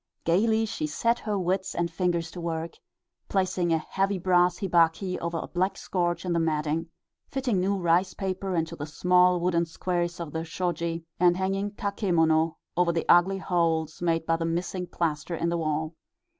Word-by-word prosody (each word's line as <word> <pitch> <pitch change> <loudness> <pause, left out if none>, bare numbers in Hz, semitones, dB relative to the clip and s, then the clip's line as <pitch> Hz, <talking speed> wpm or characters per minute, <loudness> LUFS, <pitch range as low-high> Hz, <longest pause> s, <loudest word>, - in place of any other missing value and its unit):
Gaily 220 +6 +3
she 305 +8 -3
set 235 -5 +1
her 210 -2 -2
wits 190 +1 -1
and 170 0 -1
fingers 170 -1 -1
to 175 - -7
work 165 0 -3 0.6
placing 185 -3 0
a 165 - +4
heavy 195 +5 -1
brass 180 -1 +3
hibachi 180 0 +2
over 170 0 -3
a - - -4
black 185 +2 -1
scorch 175 -1 -1
in 180 - 0
the 170 - +2
matting, 160 0 0 0.4
fitting 255 -7 -1
new 195 +2 +1
rice 175 +1 +2
paper 190 -1 -3
into 165 -1 -1
the 145 - -6
small 180 +3 +3
wooden 170 -1 +1
squares 175 +1 -2
of 165 -3 -5
the 160 0 -2
shoji, 170 -1 -3
and 175 0 +4
hanging 195 +2 -1
kakemono 165 -6 +1 0.2
over 175 -1 +3
the 165 -1 -1
ugly 180 +3 +5
holes 165 -4 0
made 165 -2 +1
by 165 0 +2
the 165 - -3
missing 175 +2 -2
plaster 170 0 -2
in 170 +1 -1
the 170 - 0
wall. 155 0 -1
175 Hz, 175 wpm, -27 LUFS, 165-185 Hz, 0.6 s, ugly